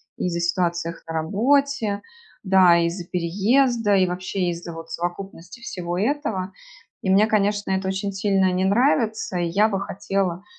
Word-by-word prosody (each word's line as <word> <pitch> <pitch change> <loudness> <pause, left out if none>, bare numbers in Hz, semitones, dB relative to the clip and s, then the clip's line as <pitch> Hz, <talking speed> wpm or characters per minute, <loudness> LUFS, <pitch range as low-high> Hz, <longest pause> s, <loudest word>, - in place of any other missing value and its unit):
из-за 170 -1 -2
ситуаций 170 -1 -1 0.2
на - - -4
работе. 220 - +1 0.4
Да, 185 -3 +5
из-за 170 +2 -1
переезда 205 +6 +2
и 185 -1 +3
вообще 180 +1 -2
из-за 170 0 -7
вот 165 0 -9
совокупности 175 +3 -6
всего 175 -6 -4
этого. 215 -6 -2 0.5
И 190 - -2
мне, 200 +3 +5
конечно, 205 -2 0
это 190 0 -1
очень 195 +1 -3
сильно 195 -1 +2
не 185 +1 0
нравится. 220 -2 +1
И 175 - 0
я 200 +6 +3
бы 195 -3 -2
хотела, 195 -2 -2
190 Hz, 145 wpm, -23 LUFS, 175-210 Hz, 0.5 s, Да